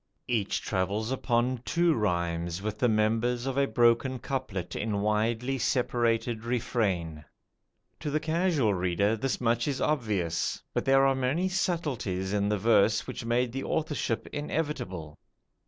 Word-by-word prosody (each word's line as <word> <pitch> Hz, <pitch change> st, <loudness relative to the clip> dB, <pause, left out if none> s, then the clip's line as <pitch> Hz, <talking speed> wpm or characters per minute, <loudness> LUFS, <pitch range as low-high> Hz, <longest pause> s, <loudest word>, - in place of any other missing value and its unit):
Each 110 Hz, -5 st, 0 dB
travels 105 Hz, +4 st, -1 dB
upon 125 Hz, -1 st, 0 dB
two 170 Hz, +3 st, +2 dB
rhymes 85 Hz, -, -1 dB
with 105 Hz, +1 st, -4 dB
the 125 Hz, -, +3 dB
members 115 Hz, +3 st, +1 dB
of 135 Hz, -1 st, -2 dB
a 140 Hz, 0 st, +2 dB
broken 120 Hz, +2 st, +3 dB
couplet 125 Hz, -10 st, -4 dB
in 105 Hz, -2 st, -1 dB
widely 115 Hz, +5 st, 0 dB
separated 120 Hz, -2 st, 0 dB
refrain. 100 Hz, -10 st, -1 dB, 0.8 s
To 150 Hz, -, -3 dB
the 150 Hz, +2 st, +1 dB
casual 155 Hz, -, +1 dB
reader 95 Hz, +4 st, +1 dB
this 130 Hz, +4 st, -2 dB
much 120 Hz, 0 st, +1 dB
is 140 Hz, -2 st, -1 dB
obvious, 105 Hz, -, -1 dB
but -, -, -1 dB
there 135 Hz, 0 st, +5 dB
are 135 Hz, -, +4 dB
many 135 Hz, +8 st, 0 dB
subtleties 135 Hz, -, -1 dB
in 100 Hz, 0 st, +1 dB
the 105 Hz, -, +1 dB
verse 105 Hz, -1 st, +3 dB
which -, -, -6 dB
made 120 Hz, +1 st, +1 dB
the 135 Hz, +2 st, -4 dB
authorship 150 Hz, -7 st, -1 dB
inevitable. 145 Hz, -, -3 dB
115 Hz, 140 wpm, -28 LUFS, 100-135 Hz, 0.8 s, there